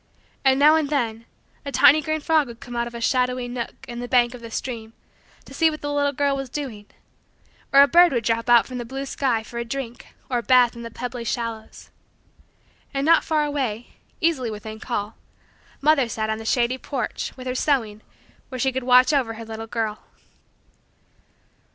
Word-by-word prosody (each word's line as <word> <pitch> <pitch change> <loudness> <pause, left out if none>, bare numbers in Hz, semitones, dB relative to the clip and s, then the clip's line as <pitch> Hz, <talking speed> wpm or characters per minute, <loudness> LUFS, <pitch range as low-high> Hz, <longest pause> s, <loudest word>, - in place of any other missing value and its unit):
And 265 -1 +4
now 300 +2 +7
and 310 -3 0
then 230 -6 -1 0.4
a 280 - -5
tiny 310 +2 +6
green 310 +1 -2
frog 310 -2 +2
would 235 -1 -11
come 245 - -9
out 235 0 -1
of 235 - -10
a - - -5
shadowy 250 0 +1
nook 240 -1 -6
in 240 -1 -6
the 245 - -5
bank 240 -1 +3
of 250 - -10
the 230 - -8
stream 225 -1 -5 0.5
to - - -13
see 325 -1 +3
what 305 -1 -7
the 290 0 -3
little 285 0 +1
girl 280 0 0
was 270 -1 -5
doing; 240 -8 -6 0.8
or 275 +1 +8
a - - +4
bird 350 +3 +6
would 240 -3 -1
drop 230 +1 0
from 240 - +7
out 235 - +5
the 250 -2 -6
blue 270 +3 -5
sky 255 -5 -1
for 235 +2 -7
a - - -1
drink 240 0 -6 0.2
or 245 -2 0
a - - -4
bath 245 +1 +4
in 235 - -8
the 230 - -6
pebbly 245 +1 -6
shallows. 230 -1 -5 1.0
And 275 +1 0
not 330 +1 +5
far 310 -2 +1
away 255 -6 -3 0.3
easily 300 -8 +1
within 215 0 -7
call 215 -2 -4 0.6
mother 280 -4 +3
sat 220 0 -2
on 220 - -3
the 225 - -8
shady 245 +2 +1
porch, 255 0 -4
with 255 - -9
her 255 - -2
sewing, 235 -6 0 0.5
where 255 - -6
she 265 +1 +1
could 260 +1 -3
watch 255 +3 +5
over 245 -6 0
her 225 0 -8
little 225 0 -7
girl. 220 -2 -3
250 Hz, 200 wpm, -23 LUFS, 230-275 Hz, 1.0 s, or